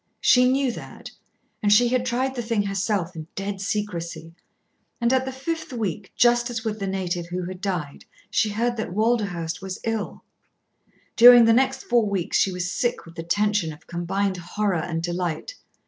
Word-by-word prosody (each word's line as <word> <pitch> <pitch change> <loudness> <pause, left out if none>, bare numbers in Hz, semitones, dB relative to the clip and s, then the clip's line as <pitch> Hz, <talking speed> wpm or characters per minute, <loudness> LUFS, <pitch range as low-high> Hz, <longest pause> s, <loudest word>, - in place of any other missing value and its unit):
She 250 0 +5
knew 270 -1 +1
that. - - -10 0.5
And 205 - +2
she 240 +3 +5
had 250 0 0
tried 260 +2 0
the 245 - -3
thing 225 -3 0
herself 195 -3 -1
in 160 -1 -7
dead 195 0 -4
secrecy. 180 -5 -4 0.7
And 235 +1 +2
at 260 0 +2
the 265 - -3
fifth 315 +5 -4
week, 205 -5 -4
just 240 0 +3
as 230 -1 -5
with 215 -1 -2
the 195 - -3
native 180 -3 -2
who 180 +1 -4
had 185 0 -7
died, 175 -8 -4 0.3
she 220 - +2
heard 235 +3 -1
that 220 -5 -4
Walderhurst 200 -8 0
was 190 -1 -6
ill. 225 -2 -3 0.9
During 240 0 +9
the 225 - +5
next 265 +2 +1
four 235 -3 +2
weeks 190 -4 0
she 195 - +2
was 180 0 -3
sick 240 +4 -1
with 165 - -13
the 165 - -6
tension 205 0 0
of 150 - -13
combined 185 +3 -2
horror 180 +1 -1
and 165 0 -3
delight. 175 - -3
205 Hz, 180 wpm, -24 LUFS, 180-240 Hz, 0.9 s, During